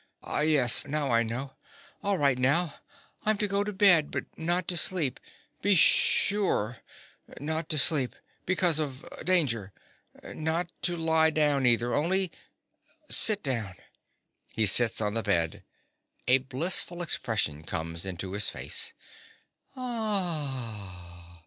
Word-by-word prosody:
_) - - -34 0.2
Ah, - - -3
yes: 145 -4 +3
now 145 -2 -1
I 115 0 +3
know. 125 +4 -4 0.5
All 200 -1 0
right 140 -4 +2
now. 145 +5 +2 0.5
I'm 215 0 +2
to 210 - 0
go 200 0 0
to 210 - -4
bed, 190 -6 +4
but - - -4
not 175 +3 -1
to 180 - -1
sleep—be 175 +4 -1
sure 170 - +2 0.6
not 160 +2 -3
to 155 - +1
sleep—because 155 +5 +1
of 145 0 -4 0.2
danger. 135 - 0 0.5
Not 165 +2 -3
to 175 -1 0
lie 160 -1 +3
down, 150 -4 +2
either, 120 0 +2
only 180 +5 +1 0.8
sit 215 -2 +5
down. 115 - -3 0.8
(_He 110 -2 +3
sits 115 +3 +3
on 105 -1 -1
the 115 - -1
bed. 85 -6 -1 0.6
A 125 +1 +5
blissful 165 +6 -1
expression 105 - -2
comes 85 +1 -5
into 95 0 -5
his 105 +2 0
face. - - -3
150 Hz, 125 wpm, -28 LUFS, 115-175 Hz, 0.8 s, sit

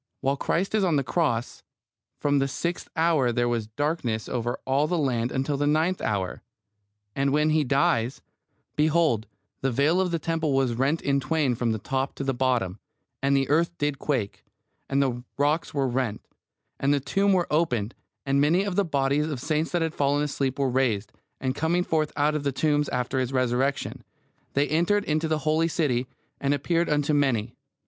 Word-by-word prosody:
While 135 +1 +1
Christ 180 +8 -1
is 215 -2 +2
on 175 -4 +2
the 140 - +2
cross 130 -6 -1 0.6
"from 145 -1 +2
the 135 - +1
sixth 170 +6 -3
hour 160 -6 +3
there 120 +1 +1
was 115 -3 -1
darkness 120 -3 -2
over 120 0 -2
all 135 +3 +2
the 175 - 0
land 125 -5 0
until 135 +2 -1
the 145 +1 0
ninth 160 +5 +1
hour," 95 -4 -2 0.7
and 140 0 +1
when 150 +2 +2
He 155 0 +3
dies, 130 -2 +1 0.6
"behold, 150 -8 +2 0.3
the 135 - +1
veil 150 +9 +3
of 185 - 0
the 170 - 0
temple 165 -3 -1
was 135 -3 +2
rent 135 +7 0
in 140 0 +2
twain 145 -2 +1
from 120 0 0
the 110 - -1
top 135 +5 -2
to - - -4
the 135 0 0
bottom; 120 -7 0 0.4
and 140 0 +3
the 135 -1 +1
earth 170 +4 +1
did 145 -2 -1
quake; 125 -9 -2 0.5
and 140 +1 +2
the 125 -2 -2
rocks 150 +3 +1
were 140 -2 0
rent; 120 -4 -1 0.6
and 140 - +2
the 145 - +3
tombs 195 +9 +2
were 175 -2 +2
opened; 125 -9 +1 0.3
and 140 0 +2
many 175 +7 +3
bodies 150 -7 +1
of - - -4
the - - -9
saints 155 +1 0
that 175 -2 +1
had 160 -1 -2
fallen 145 +1 +1
asleep 140 -3 -1
were 140 -1 +1
raised; 120 -6 0 0.3
and 130 -1 -1
coming 165 +5 +1
forth 155 -3 0
out 145 +1 +2
of 150 - -1
the 140 -1 0
tombs 150 +1 +1
after 125 +1 -1
His 130 -1 -1
Resurrection, 130 +2 0 0.5
they 140 +1 +2
entered 175 +7 +1
into 155 +1 0
the 155 0 +1
holy 160 +2 +2
city, 130 -7 0 0.3
and 140 +1 +1
appeared 170 +4 0
unto 150 0 +1
many." 125 -6 +1
140 Hz, 190 wpm, -26 LUFS, 130-155 Hz, 0.7 s, hour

